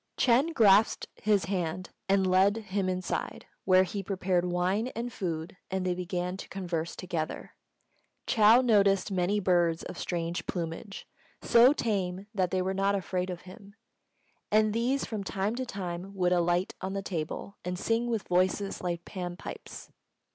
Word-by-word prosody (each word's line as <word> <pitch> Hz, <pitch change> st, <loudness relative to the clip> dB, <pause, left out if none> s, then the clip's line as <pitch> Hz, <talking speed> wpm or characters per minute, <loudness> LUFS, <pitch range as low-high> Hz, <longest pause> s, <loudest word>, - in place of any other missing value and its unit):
Ch'êng 260 Hz, +6 st, +3 dB
grasped 210 Hz, 0 st, +5 dB
his 205 Hz, -4 st, +1 dB
hand 185 Hz, -1 st, -3 dB, 0.2 s
and 195 Hz, -1 st, +3 dB
led 190 Hz, +3 st, +4 dB
him 200 Hz, -3 st, -2 dB
inside, 185 Hz, 0 st, -3 dB, 0.2 s
where 185 Hz, 0 st, +6 dB
he 195 Hz, +2 st, -4 dB
prepared 185 Hz, -2 st, 0 dB
wine 185 Hz, +6 st, +1 dB
and 235 Hz, +1 st, -4 dB
food, 170 Hz, -3 st, -4 dB
and 190 Hz, -1 st, -2 dB
they 180 Hz, -, +1 dB
began 180 Hz, 0 st, -3 dB
to -, -, -9 dB
converse 170 Hz, -4 st, -3 dB
together. 170 Hz, -4 st, -4 dB, 0.7 s
Chou 225 Hz, +3 st, +6 dB
noticed 200 Hz, -4 st, +3 dB
many 190 Hz, +2 st, +1 dB
birds 175 Hz, -3 st, +2 dB
of -, -, -7 dB
strange 170 Hz, -1 st, -3 dB
plumage, 175 Hz, +3 st, -5 dB, 0.4 s
so 240 Hz, +3 st, +7 dB
tame 195 Hz, -8 st, -1 dB
that 185 Hz, -4 st, +1 dB
they 185 Hz, 0 st, 0 dB
were 190 Hz, +1 st, -1 dB
not 195 Hz, +1 st, +1 dB
afraid 185 Hz, -1 st, -2 dB
of 180 Hz, -1 st, -5 dB
him; 200 Hz, +2 st, -14 dB, 0.8 s
and 215 Hz, 0 st, +4 dB
these 250 Hz, +5 st, 0 dB
from 215 Hz, -3 st, -4 dB
time 195 Hz, +3 st, -2 dB
to 255 Hz, 0 st, -3 dB
time 185 Hz, -1 st, -5 dB
would 180 Hz, -1 st, +2 dB
alight 175 Hz, +1 st, +1 dB
on 190 Hz, +1 st, -3 dB
the 195 Hz, 0 st, -3 dB
table 175 Hz, +2 st, -5 dB
and 180 Hz, 0 st, -3 dB
sing 230 Hz, +5 st, 0 dB
with 225 Hz, -4 st, -2 dB
voices 185 Hz, +2 st, +1 dB
like 175 Hz, -1 st, -3 dB
Pan 175 Hz, -2 st, -5 dB
pipes. -, -, -9 dB
190 Hz, 160 wpm, -29 LUFS, 180-205 Hz, 0.8 s, so